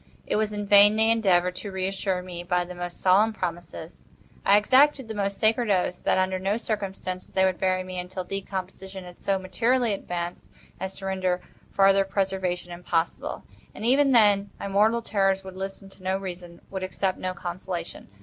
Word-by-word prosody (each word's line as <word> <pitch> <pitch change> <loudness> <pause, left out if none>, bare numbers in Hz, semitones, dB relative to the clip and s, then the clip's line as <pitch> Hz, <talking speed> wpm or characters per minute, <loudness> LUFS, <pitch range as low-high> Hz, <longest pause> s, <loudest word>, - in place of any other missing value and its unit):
It - - -1
was 215 0 +1
in 205 0 -4
vain 205 +1 +7
they 220 +1 +4
endeavored 180 -5 +3
to 195 +3 -5
reassure 190 0 -2
me 180 -1 -7
by 180 0 0
the 180 - -8
most 175 0 -6
solemn 205 +4 +4
promises. 175 -3 -6 0.4
I 200 - +6
exacted 265 +4 +4
the 220 - -5
most 200 -1 -2
sacred 225 +1 +2
oaths, 180 -2 +1
that - - +2
under 185 0 +1
no 195 +3 0
circumstances 195 -5 -4
they 190 0 +2
would 185 -1 0
bury 185 -1 +1
me 185 0 -6
until 185 +1 -5
decomposition 190 0 -6
had 180 0 -13
so 195 -1 +1
materially 225 +5 +1
advanced 175 -2 -5 0.3
as 190 0 -4
to 195 - -8
render 185 -2 0 0.3
farther 195 0 +4
preservation 190 -2 -2
impossible. 175 -1 -2 0.3
And, 215 - -5
even 275 +3 +4
then, 205 -4 +4
my - - -4
mortal 215 +4 +2
terrors 195 -3 +1
would 190 -1 -9
listen 195 +1 -6
to 195 - -18
no 190 +1 0
reason—would 180 0 -7
accept 185 0 -2
no 185 0 -3
consolation. 175 0 -6
190 Hz, 180 wpm, -26 LUFS, 180-205 Hz, 0.4 s, vain